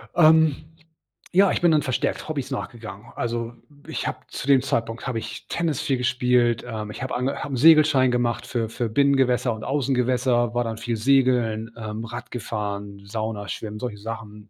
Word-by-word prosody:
Ähm, 160 -3 +6 0.8
ja, 195 +1 +5
ich - - -1
bin 170 -2 +5
dann 150 - +4
verstärkt 130 +3 -2
Hobbys 145 -4 -3
nachgegangen. 110 -4 -6
Also, 115 0 -3 0.3
ich - - -3
habe - - -3
zu 135 - -6
dem 135 -2 +6
Zeitpunkt 115 -3 -2
habe 120 -3 -1
ich 110 0 -8
Tennis 165 -5 -1
viel 135 -2 0
gespielt, 125 -2 +2
ähm, 110 -3 -5
ich 120 - -7
habe 130 - -3
ange 130 +3 -1
habe 145 - -5
'n - - -1
Segelschein 150 -3 +6
gemacht 120 -1 0
für 115 -3 -2
für 115 0 -3
Binnengewässer 130 -1 +2
und 110 - -8
Außengewässer, 125 -3 +1
war 120 - +2
dann 115 -1 -4
viel 115 0 -2
Segeln, 120 -3 +2
ähm, 110 0 -5
Radgefahren, 105 -4 -5
Sauna, 105 0 -4
Schwimmen, 105 -1 -5
solche 120 -4 -4
Sachen. 105 -1 -8
120 Hz, 175 wpm, -24 LUFS, 110-135 Hz, 0.8 s, Ähm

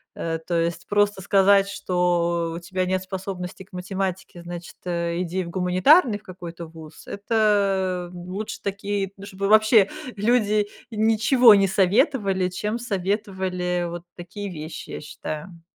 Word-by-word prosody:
э. 165 -1 -2
То 175 - -2
есть, 170 0 -3
просто 205 -1 +2
сказать, 195 +1 +4
что 175 -3 0
"у - - -4
тебя 185 +1 -2
нет 185 0 0
способности 190 -1 -6
к 190 - -27
математике, 185 0 -4
значит, 175 0 -8
иди 175 +1 -2
в 170 - -8
гуманитарный 195 - +4
в - - -28
какой-то 175 -2 -8
вуз"- 160 -1 -13
это 200 -4 +1
лучше 185 +4 -6
такие, 200 0 -2
ну, 195 - -10
чтобы 195 0 -3
вообще 215 -1 +6 0.3
люди 210 -1 +2 0.2
ничего 225 +2 +5
не 195 -1 +3
советовали, 195 - +2
чем 210 +5 -3
советовали 190 -4 -2
вот 170 0 -7
такие 195 +3 -7
вещи, 155 -1 -7
я - - -6
считаю. 155 +3 -7
190 Hz, 135 wpm, -24 LUFS, 175-205 Hz, 0.3 s, вообще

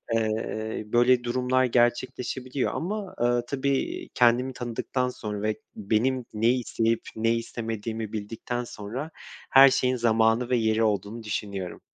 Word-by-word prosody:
Iıı, 110 0 -2
böyle 120 +1 +4
durumlar 130 +1 +1
gerçekleşebiliyor 125 +2 0
ama, 200 +2 -4
ııı, 120 0 +2
tabii 140 0 -1
kendimi 125 +2 +3
tanıdıktan 125 +1 -2
sonra 105 -4 -5
ve 110 0 -1 0.2
benim 115 +5 0
ne 110 +2 +2
isteyip 115 -2 +1 0.2
ne 115 +1 +2
istemediğimi 115 -1 -4
bildikten 115 +3 -4
sonra 120 +9 -6 0.4
her 135 +1 +9
şeyin 130 -1 +1
zamanı 115 +1 +2
ve 125 - +3
yeri 110 0 +2
olduğunu 105 +2 -1
düşünüyorum. 100 -3 -4
120 Hz, 125 wpm, -26 LUFS, 110-125 Hz, 0.4 s, her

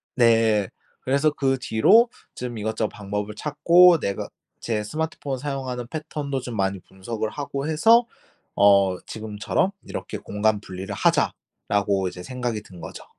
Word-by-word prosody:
네. 115 -4 +3 0.3
그래서 140 +4 +2
그 135 -2 0
뒤로 215 - +4 0.3
좀 120 -2 -5
이것저것 110 +1 -1
방법을 105 +1 -5
찾고 170 +6 +5
내가 100 -6 -3 0.3
제 110 -2 -1
스마트폰 145 +2 -3
사용하는 130 -3 -4
패턴도 150 -2 -4
좀 120 -2 -6
많이 95 -1 0
분석을 105 +5 -5
하고 140 +2 -4
해서 225 +10 +5 0.5
어 100 -2 +5
지금처럼 110 - -2 0.2
이렇게 - - -5
'공간 105 0 0
분리를 95 -1 -7
하자!'라고 100 -2 0
이제 90 0 -7
생각이 120 -1 -3
든 90 -4 -14
거죠. - - -9
115 Hz, 300 characters per minute, -24 LUFS, 105-140 Hz, 0.5 s, 찾고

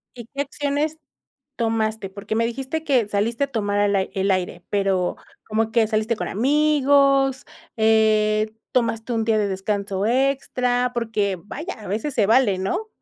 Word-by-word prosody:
¿Y 240 -2 -10
qué 280 +2 -4
acciones 290 +2 -2 0.6
tomaste? 220 -3 -1
Porque, 200 +2 -5
me 230 +1 +2
dijiste 265 +6 -4
que 255 -8 +2
saliste 225 +6 0
a - - -3
tomar 205 -3 0
el 205 0 +2
ai 190 - -1
el 195 +1 0
aire, 180 -2 -1
pero, 195 -3 0 0.3
como 220 +1 0
que 225 -1 +3
saliste 220 +1 0
con - - -3
amigos, 275 +1 +3 0.3
eh, 215 -1 +3 0.2
tomaste 230 -1 0
un 225 -1 0
día 220 -1 +2
de 205 -1 +1
descanso 195 +1 -2
extra, 250 -1 +1
porque 215 -5 -1
vaya, 310 - -6
a 210 - -10
veces 220 +9 -2
se 215 -6 +3
vale, 220 -3 +3
¿no? 365 - -2
225 Hz, 160 wpm, -22 LUFS, 205-265 Hz, 0.6 s, que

